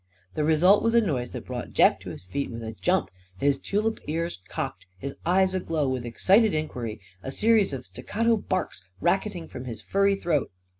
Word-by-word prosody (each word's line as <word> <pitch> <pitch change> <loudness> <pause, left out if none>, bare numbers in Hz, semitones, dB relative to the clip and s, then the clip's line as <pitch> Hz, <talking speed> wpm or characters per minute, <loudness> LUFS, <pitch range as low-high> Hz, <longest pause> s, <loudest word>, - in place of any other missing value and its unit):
The 155 - -1
result 160 +6 +5
was 230 0 +2
a - - +8
noise 135 - -1
that - - -7
brought - - -6
Jeff - - +5
to - - -8
his - - -9
feet 140 +9 -3
with 115 -1 -6
a 110 - -4
jump; 180 +11 0 0.3
his 140 +5 +2
tulip 215 +7 -1
ears 165 - -2
cocked, - - -5
his 140 +7 -5
eyes 190 +1 +3
aglow 165 -5 0
with 130 -2 -2
excited 195 - +4
inquiry; 125 -8 -3 0.2
a - - -5
series 215 +5 +3
of 135 -3 -5
staccato 225 - 0
barks 185 - -2 0.2
racketing 185 - 0
from 125 - -8
his 115 -4 -6
furry 195 - +2
throat. 170 -7 0
160 Hz, 190 wpm, -26 LUFS, 130-195 Hz, 0.3 s, a